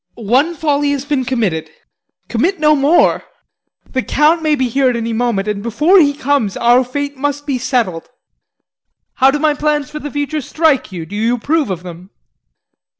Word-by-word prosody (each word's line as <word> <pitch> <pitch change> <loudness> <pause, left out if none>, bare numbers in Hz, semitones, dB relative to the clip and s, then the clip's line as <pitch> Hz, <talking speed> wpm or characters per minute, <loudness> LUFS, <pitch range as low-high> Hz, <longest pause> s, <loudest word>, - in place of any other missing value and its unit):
One 255 +10 +1
folly 290 -2 0
has 280 -1 -4
been 285 -3 -1
committed 215 -11 -1 0.6
commit 335 +11 -1
no 305 0 +4
more. 290 +5 +3 0.7
The 260 - -1
Count 305 +5 +2
may 310 -1 +2
be 260 -2 0
here 265 +2 +1
at 245 - -1
any 230 0 -3
moment, 225 -4 -1
and 210 -1 -2
before 300 - +3
he 285 -3 +3
comes, 275 -8 -1
our 240 +2 +4
fate 285 +2 -5
must 290 +1 -3
be 275 -4 -2
settled. 230 -10 -2 1.1
How 265 0 +5
do 280 - 0
my 300 0 +2
plans 295 -1 -1
for 300 - -6
the 295 - -6
future 290 +1 -3
strike 305 -3 0
you? 170 -3 -6
Do 200 - -9
you 225 +3 +1
approve 295 +2 -1
of 180 -2 -4
them? 180 +1 -10
270 Hz, 180 wpm, -16 LUFS, 230-295 Hz, 1.1 s, How